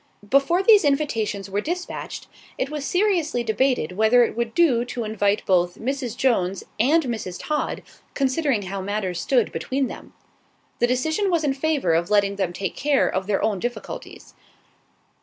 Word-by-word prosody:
Before 275 - +3
these 420 0 +7
invitations 225 -9 0
were 200 +1 -2
despatched, 355 +7 -5 0.3
it 270 - -2
was 300 -2 -4
seriously 355 - +1
debated 235 - +1
whether 220 +5 +4
it 230 - -2
would 235 -1 -3
do 270 -9 +4
to 245 -1 -4
invite 210 -1 0
both 175 -2 +2
Mrs. 255 -2 -3
Jones 195 -8 +1 0.2
and 305 +8 +4
Mrs. 220 -8 -4
Todd, 300 -1 -2 0.3
considering 270 -4 +1
how 195 +1 -4
matters 190 -3 -2
stood 245 0 +1
between 265 -1 -2
them. - - -11 0.6
The 240 - +3
decision 315 +11 0
was 340 -3 +1
in 285 -2 +1
favour 275 - 0
of 170 +3 +1
letting 200 -1 +2
them 190 -3 -1
take 190 +2 -4
care 285 -1 +2
of 190 +1 -2
their 205 -1 0
own 210 -3 0
difficulties. 240 +5 -6
240 Hz, 160 wpm, -23 LUFS, 200-285 Hz, 0.6 s, these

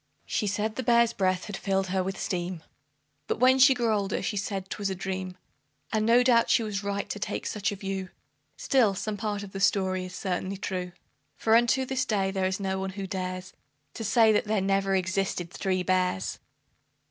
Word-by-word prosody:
She 210 - -1
said 210 +2 -1
the - - 0
bears' 235 -1 +4
breath 185 -1 0
had 205 - -5
filled 195 -1 -1
her 190 0 +1
with 190 +1 -4
steam, 175 -2 -3 0.6
But - - -1
when 260 +2 +5
she 265 0 +7
grew 235 -3 +1
older 200 -2 -1
she 210 - -2
said 195 -1 -3
'twas 200 0 -3
a 190 - -2
dream, 185 0 -4 0.6
And 215 0 +1
no 240 +2 +6
doubt 235 -2 +4
she 230 - +4
was 205 -2 -3
right 200 0 -2
to 205 - -5
take - - -3
such 205 -2 -1
a - - -4
view; 195 -1 -4 0.5
Still, 230 -7 +3
some 210 +2 -3
part 205 0 -3
of 195 - -9
the 195 - -5
story 185 -1 +1
is 180 - -8
certainly 190 0 -3
true, 180 -2 -4 0.4
For 220 0 +3
unto 240 +3 +3
this 260 0 -1
day 195 -3 0
there 190 -1 0
is 190 +1 -2
no 190 -1 -2
one 190 0 -4
who 195 0 -5
dares, 185 0 -4 0.4
To 225 - -6
say 220 +1 +5
that 210 - +2
there 215 0 +1
never 195 0 +1
existed 190 -2 -1
THREE 185 -1 -1
BEARS. 180 - 0
195 Hz, 205 wpm, -27 LUFS, 190-215 Hz, 0.6 s, she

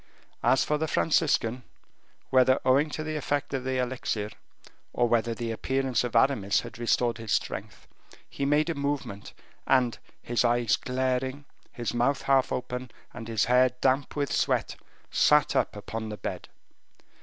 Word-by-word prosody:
As 130 - +3
for 150 0 0
the 160 - -1
Franciscan, 140 -7 +1 0.7
whether 130 0 +5
owing 140 +4 +4
to 155 - -4
the 155 0 -4
effect 145 -1 -2
of 135 -2 -2
the 130 0 -1
elixir, 120 -4 -2 0.6
or 120 - +2
whether 115 0 +1
the 115 0 -3
appearance 130 +1 0
of 120 -1 -4
Aramis 110 -6 +3
had - - -10
restored 120 -1 +1
his 115 -3 -6
strength, - - -3 0.4
he - - -5
made 150 +4 +2
a - - -1
movement, 140 -9 -4 0.3
and 125 -3 +2 0.2
his 120 0 0
eyes 120 -2 +2
glaring, 130 +2 -2 0.3
his 120 -3 -4
mouth 125 +4 +1
half 135 -1 +3
open, 125 0 -4 0.2
and 115 -2 -8
his 110 -3 +1
hair 125 +1 +4
damp 135 +2 +1
with 145 -1 -1
sweat, - - 0 0.4
sat 150 -1 +4
up - - +1
upon 110 +1 -5
the 105 - -6
bed. - - -6
130 Hz, 155 wpm, -27 LUFS, 120-140 Hz, 0.7 s, whether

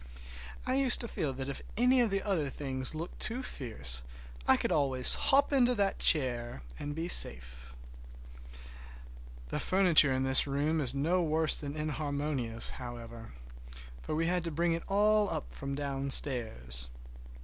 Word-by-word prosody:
I 255 - 0
used 270 -3 +4
to 235 - -5
feel 155 -9 -3
that 135 0 -6
if 140 - -5 0.2
any 250 +2 +3
of 235 - +1
the 195 -1 -2
other 170 -9 -1
things 130 0 -4
looked 165 +3 -7
too 245 +4 -1
fierce 70 - -4 0.5
I - - +5
could - - -2
always 135 -4 +4
hop 280 +1 +2
into 250 -2 +3
that 200 -2 -1
chair 120 - +3 0.2
and 145 0 -6
be 165 +2 -4
safe. 60 - +1 1.7
The - - -3
furniture 180 -7 +5
in 130 0 -1
this 130 +2 +3
room 150 +3 -1
is 130 -1 0
no 165 +6 0
worse 160 -1 +2
than 145 0 -6
inharmonious, 145 -6 -3
however, 115 - -9 0.7
for 155 - -5
we 165 +1 0
had 175 0 -1
to - - -2
bring 165 +2 -1
it 165 - -3
all 205 -5 +1
from 140 0 -6
downstairs. 125 - 0
145 Hz, 150 wpm, -30 LUFS, 130-175 Hz, 1.7 s, I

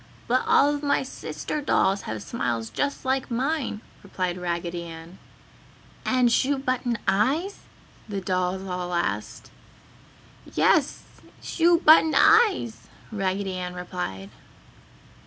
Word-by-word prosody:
"But 255 +2 +2
all 290 +1 +4
of 290 - -4
my 285 -2 +1
sister 295 +3 -5
dolls 195 -8 +2
have 110 -1 -4
smiles 115 +1 -3
just 285 -1 -2
like 260 0 0
mine!" 260 -2 -2 0.2
replied 185 -3 -3
Raggedy 175 -1 -3
Ann. 165 +2 -11 0.9
"And 250 -2 +3
shoe 275 +4 +2
button 255 -2 -1
eyes?" 290 - +1 0.5
the 200 -1 -3
dolls 185 0 -1
all 180 -1 -4
asked. 170 - -3 1.0
"Yes, - - +2 0.4
shoe 340 0 +3
button 315 0 +6
eyes!" 420 - +3 0.2
Raggedy 195 -1 -2
Ann 180 -1 -5
replied. 95 - -6
200 Hz, 115 wpm, -25 LUFS, 180-275 Hz, 1.0 s, button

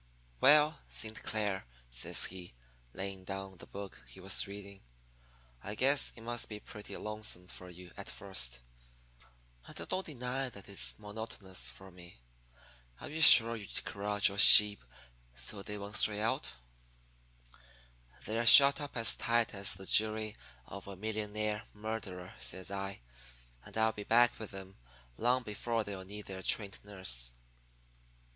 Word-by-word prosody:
"'Well, 150 +1 +4
Saint 110 0 -2
Clair,' 105 - -4 0.2
says - - +1
he, 90 -7 -7 0.4
laying 95 +2 -7
down 95 0 -8
the - - -13
book 100 -9 -10
he - - -15
was 95 +1 +2
reading, 100 0 -11 0.8
'I 105 - -7
guess 140 +4 +2
it 115 - -14
must 120 +1 -1
be 105 -1 -8
pretty 105 -1 -11
lonesome 105 -4 -6
for 90 +1 -11
you 90 0 -14
at - - -9
first. - - -3 1.1
And - - -11
I - - -6
don't 185 +1 -3
deny 130 -3 -5
that 100 -5 -13
it's 100 -1 -1
monotonous 105 -3 -8
for 95 0 -14
me. 85 -1 -15 0.8
Are - - -10
you 155 +2 -6
sure 115 -6 +8
you 105 -3 -9 0.2
corralled 105 0 0
your 100 0 -4
sheep 105 -3 +10 0.5
so 65 - -5
they 105 +1 -7
won't 100 +1 -8
stray 105 -1 +2
out?' 110 +2 -3 1.7
"'They're 115 +2 -2
shut 140 +4 +9
up 145 -3 -8
as 115 0 +2
tight 115 0 -1
as 100 -1 -1
the 95 +1 -12
jury 110 +1 +2 0.3
of 100 +6 -11
a 100 - -9
millionaire 105 +1 -5
murderer,' 105 -4 -8
says 95 +10 -4
I. 100 -3 -6 0.6
'And - - -11
I'll 110 0 +1
be 105 - -9
back 120 +3 +2
with 110 - -8
them 95 -1 -12 0.4
long 125 +2 0
before 115 +1 -4
they'll 100 -2 -8
need 105 +2 -10
their 95 -1 -9
trained 100 0 -1
nurse.' 75 -13 -4
105 Hz, 150 wpm, -31 LUFS, 95-110 Hz, 1.7 s, sheep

